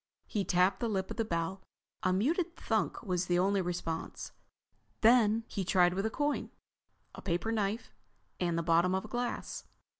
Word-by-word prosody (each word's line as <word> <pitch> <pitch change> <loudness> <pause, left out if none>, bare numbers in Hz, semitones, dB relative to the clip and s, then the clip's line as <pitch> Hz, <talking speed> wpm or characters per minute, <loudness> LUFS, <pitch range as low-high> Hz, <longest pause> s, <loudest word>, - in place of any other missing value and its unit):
He 205 - -1
tapped 185 +1 +3
the 235 - -1
lip 190 -2 -1
of - - -5
the 225 - +2
bell. 175 0 -2 0.4
A 185 - +2
muted 330 - +1
thunk - - -1
was 180 -4 -1
the 175 - +2
only 195 +2 +2
response. 170 -2 -4 0.7
Then 225 -1 +5
he 195 - -3
tried 180 -1 +4
with 195 +3 0
a - - -1
coin, 290 +5 -1 0.6
a - - -9
paper 175 +4 -1
knife, 215 +1 -1 0.5
and 175 -2 0
the 170 - 0
bottom 170 +3 +3
of 190 - -2
a - - -10
glass. 245 +1 -3
190 Hz, 175 wpm, -32 LUFS, 180-225 Hz, 0.7 s, Then